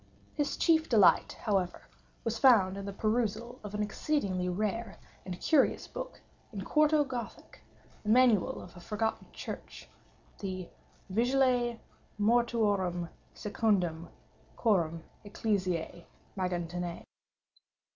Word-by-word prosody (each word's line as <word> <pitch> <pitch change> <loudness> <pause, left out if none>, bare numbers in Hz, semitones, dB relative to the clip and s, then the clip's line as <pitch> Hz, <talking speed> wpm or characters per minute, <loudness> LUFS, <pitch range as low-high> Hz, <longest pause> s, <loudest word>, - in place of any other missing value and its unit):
His 290 -2 -1
chief 320 -2 +3
delight, 210 -6 +5
however, 195 -5 0 0.4
was 230 0 -2
found 210 -8 +6
in 200 0 -6
the 200 - -4
perusal 230 +3 -1
of 210 0 -6
an 210 - 0
exceedingly 205 -5 -1
rare 215 +3 -2 0.3
and 180 -1 -5
curious 305 -4 +2
book - - -7 0.3
in 200 -4 -5
quarto 305 +4 +4
Gothic—the 245 -4 -9
manual 235 -4 +4
of 175 - -13
a - - -10
forgotten 220 +4 -2
church—the 185 -3 -8 0.4
Vigiliae 245 +1 +2 0.4
Mortuorum 205 -6 +2 0.3
secundum 185 -6 0 0.5
Chorum 170 -7 +1 0.2
Ecclesiae 185 -5 -2 0.3
Maguntinae. 175 -2 -3
210 Hz, 100 wpm, -31 LUFS, 185-240 Hz, 0.5 s, found